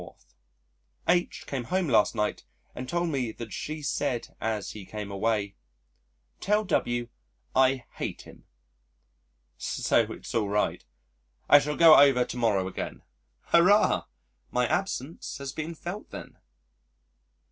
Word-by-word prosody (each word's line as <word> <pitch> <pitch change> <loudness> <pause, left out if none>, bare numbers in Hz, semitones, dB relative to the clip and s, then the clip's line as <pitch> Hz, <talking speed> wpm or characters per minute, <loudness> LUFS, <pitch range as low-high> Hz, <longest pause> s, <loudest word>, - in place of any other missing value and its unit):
H 175 0 +1
came 130 -4 -4
home 185 +5 0
last 115 -3 +3
night 105 -1 -1 0.3
and 125 0 -7
told 175 0 0
me 130 -6 -1
that 110 -4 -8
she 155 0 -5
said 135 -3 -2
as 110 -2 -2
he 105 - -9
came 105 +1 -7
away, 100 0 -1 0.9
"Tell 210 +2 +1
W 120 -9 0 0.5
I 130 -1 +3
hate - - -4
him." - - -16 1.1
So - - +1
it's - - -8
all 110 -3 0
right. 105 +1 0 0.6
I 145 - +8
shall 150 +1 -2
go 165 -2 +9
over 135 -3 +5
to - - -7
morrow 105 -6 +1
again 95 - -6 0.5
Hurrah! 195 +5 +4 0.4
My 125 0 +1
absence 165 -3 -3
has 140 -1 -6
been 160 +2 -5
felt 175 +6 -7
then. - - -10
130 Hz, 130 wpm, -27 LUFS, 110-160 Hz, 1.1 s, go